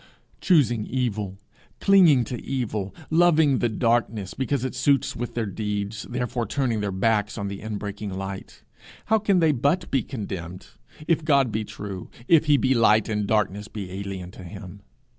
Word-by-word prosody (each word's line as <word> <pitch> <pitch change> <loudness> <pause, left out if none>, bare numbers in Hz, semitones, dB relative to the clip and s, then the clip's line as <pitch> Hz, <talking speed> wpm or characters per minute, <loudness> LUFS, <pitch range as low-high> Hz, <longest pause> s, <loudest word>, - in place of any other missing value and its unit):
Choosing 120 - +2
evil, 105 -7 -2 0.4
clinging 175 -10 +6
to 120 +1 -6
evil, 110 -7 -3 0.2
loving 160 -5 +4
the 120 - +1
darkness 110 -3 0
because 130 0 -1
it 130 - -3
suits 135 +1 +1
with 120 +1 -5
their 115 -2 0
deeds, 105 +1 -4
therefore 125 -1 -2
turning 125 -6 0
their 100 -1 -2
backs 105 +2 0
on 100 -2 -3
the 100 0 -7
inbreaking 105 -1 -5
light, 95 +1 -7 0.4
how 220 0 +3
can 200 -2 +2
they 165 -3 +4
but 145 +7 0
be 135 - +2
condemned 95 -8 -7 0.4
if 165 -2 +2
God 140 -6 +3
be 110 +1 -1
true, 100 -3 -7 0.2
if 160 -2 +5
he 145 -1 +5
be 130 -1 +2
light, 110 -3 +4
and 105 -2 -1
darkness 105 -1 0
be 100 -4 -7
alien 95 -2 -6
to 95 - -12
him! 95 +2 -10
110 Hz, 165 wpm, -24 LUFS, 100-135 Hz, 0.4 s, clinging